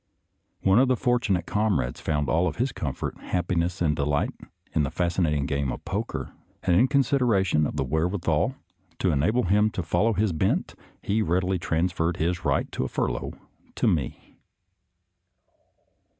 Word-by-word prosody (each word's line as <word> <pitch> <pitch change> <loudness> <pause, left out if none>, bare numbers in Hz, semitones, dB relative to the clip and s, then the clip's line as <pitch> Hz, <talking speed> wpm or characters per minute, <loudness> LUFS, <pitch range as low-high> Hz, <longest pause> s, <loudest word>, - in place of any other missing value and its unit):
One 95 +3 +4
of 130 - +4
the 130 - +3
fortunate 115 -8 +1
com 105 -6 +1
rades - - -4
found 75 -2 0
all 85 +3 +2
of 80 - -3
his 125 +4 0
comfort, 70 -5 -4
happiness, 90 0 -1
and 75 -3 +2
delight 75 0 0 0.4
in 80 - +2
the 70 - 0
fascinating 85 -5 0
game 70 -2 -1
of - - -7
poker, 105 +5 -3 0.3
and, 85 - +3
in 125 +9 +5
consideration 115 - +2
of - - -6
the - - 0
wherewithal 85 - 0 0.4
to 95 - +1
enable 85 - +2
him 105 +4 +3
to 95 - -4
follow 90 +8 +2
his 105 -1 +1
bent, 80 - 0 0.3
he 110 +2 +1
readily 90 0 +1
transferred 85 0 0
his 85 +2 -1
right - - 0
to - - -2
a - - -1
furlough - - -2 0.4
to - - 0
me. 70 -7 -2
90 Hz, 160 wpm, -26 LUFS, 80-105 Hz, 0.4 s, in